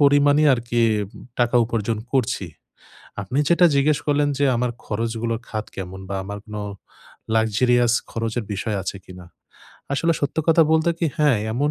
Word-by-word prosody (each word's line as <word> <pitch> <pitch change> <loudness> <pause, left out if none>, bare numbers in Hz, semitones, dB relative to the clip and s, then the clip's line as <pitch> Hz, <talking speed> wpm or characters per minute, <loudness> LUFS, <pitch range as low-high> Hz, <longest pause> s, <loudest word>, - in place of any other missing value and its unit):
পরিমাণই 145 +1 +5
আরকি 120 0 -2 0.3
উম - - -15 0.2
টাকা 120 +1 +3
উপার্জন 110 -1 -2
করছি। 125 -7 0 0.8
আপনি 125 +8 -2
যেটা 175 +1 +5
জিজ্ঞেস 145 +1 +3
করলেন 145 0 +2
যে, 140 - +3
"আমার 125 0 0
খরচগুলো 115 +1 -2
খাত 110 -1 -3
কেমন 95 0 -6
বা 100 - -2
আমার 100 +1 -6
কোনো 105 -1 -6 0.7
লাক্সেরিয়াস 120 +2 +3 0.2
খরচের 115 0 -2
বিষয় 105 +2 -2
আছে 100 - -4
কিনা?" 90 -1 -11 0.7
আসলে 165 +4 +2
সত্য 145 +2 -2
কথা 165 0 +6
বলতে 160 +1 +3
কি? 170 - +1
হ্যাঁ, 145 -7 +4
এমন 145 +5 0
120 Hz, 155 wpm, -22 LUFS, 110-145 Hz, 0.8 s, কথা